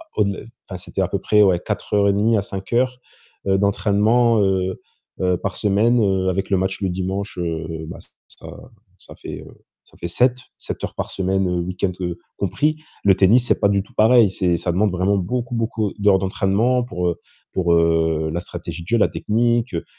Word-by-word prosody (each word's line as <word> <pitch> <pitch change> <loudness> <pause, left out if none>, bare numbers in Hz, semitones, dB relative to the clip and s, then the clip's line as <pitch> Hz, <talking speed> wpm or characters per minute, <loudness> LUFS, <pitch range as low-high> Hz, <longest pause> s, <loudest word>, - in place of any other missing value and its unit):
au-delà 100 -2 0 0.3
enfin, 95 - -5
c'était 95 +1 -4
à 90 - +1
peu 100 - -1
près, 105 0 +3
ouais, 90 -3 +3
4 - - -5
heures 100 0 +4
et - - +3
1/2 110 +2 +2
à - - +1
5 95 +2 -7
heures, 125 +1 +1 0.5
heu, 95 0 +3
d'entraînement, 105 +3 +2
heu 95 -1 0 0.4
heu, 90 -1 +2
par 100 +1 -4
semaine, 110 +4 +2
heu, 95 -1 +1
avec 95 +1 -2
le 95 - +2
match 95 +2 -2
le 95 - 0
dimanche, 95 +2 -4
heu 80 -2 -3 0.2
bah, - - -8 0.3
ça - - -13 0.5
ça - - -13
fait, - - -8
heu, - - -18 0.2
ça - - -23
fait 85 - -5
7. 125 +7 +2 0.2
7 - - -7
heures - - -4
par - - -4
semaine, 95 0 0
heu, 90 -1 -1
week-end, 90 +1 -2 0.5
compris. 145 - 0 0.3
Le 95 -2 +6
tennis, 110 +6 +4
c'est - - +2
pas 100 - +4
du 100 -1 +2
tout - - -23
pareil. 110 -1 +5
C'est 90 -3 0
ça 85 +1 -2
demande 100 +1 +2
vraiment 95 +3 +1
beaucoup, 120 +6 -2
beaucoup 110 -3 -1
d'heures 100 -2 +4
d'entraînement 105 +6 +1
pour, 90 -7 -3
heu, 85 - -4 0.3
pour, 85 -2 +1
heu, 80 -1 +2
la 85 - -1
stratégie 85 -1 -7
de - - -17
jeu, 115 - +3
la 105 - +4
technique, 120 +1 0
heu, 85 - -3
95 Hz, 205 wpm, -21 LUFS, 90-110 Hz, 0.5 s, Le